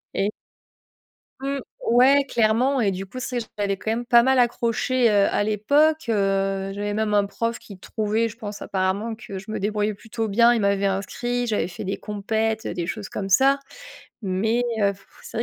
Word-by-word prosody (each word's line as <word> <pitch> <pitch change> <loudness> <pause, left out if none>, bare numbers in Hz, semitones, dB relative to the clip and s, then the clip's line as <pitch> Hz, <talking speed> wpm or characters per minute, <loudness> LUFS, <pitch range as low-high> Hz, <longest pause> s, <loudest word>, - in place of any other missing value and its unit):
et 200 +2 +1 1.1
Mmh, 275 0 -2 0.3
ouais 265 +4 +5
clairement 245 +2 +2
et 205 -4 +2
du 190 +1 -5
coup 255 +6 -8
c'est 250 0 -3
vrai 230 - -5
j'avais 200 -1 0
quand 220 - -4
même 240 +2 -2
pas 235 -1 +5
mal 265 -1 +4
accroché, 240 +1 +1
heu, 205 -2 +4
à 205 - +1
l'époque, 285 +9 +2
heu, 195 -2 0
j'avais 205 +1 -3
même 215 0 0
un 205 -1 +3
prof 230 +3 -3
qui 200 -3 -12
trouvait 220 +3 -1
je 225 - -11
pense, 210 -3 -7
apparemment, 195 +4 -1
que 205 -3 -8
je 195 +3 -12
me 215 - -3
débrouillais 210 +1 0
plutôt 225 +2 -4
bien, 235 +4 +5
il 235 - +1
m'avait 200 0 +1
inscrit, 240 +5 -2
j'avais 210 -6 0
fait 180 - -7
des 195 - -2
compètes, 220 +1 -2
heu, - - -3
des 175 -2 -3
choses 210 0 -5
comme 195 - -4
ça! 270 +8 +4 0.6
Mais 220 +5 0 0.6
c'est - - -8
vrai, - - +1
220 Hz, 190 wpm, -23 LUFS, 200-240 Hz, 1.1 s, ouais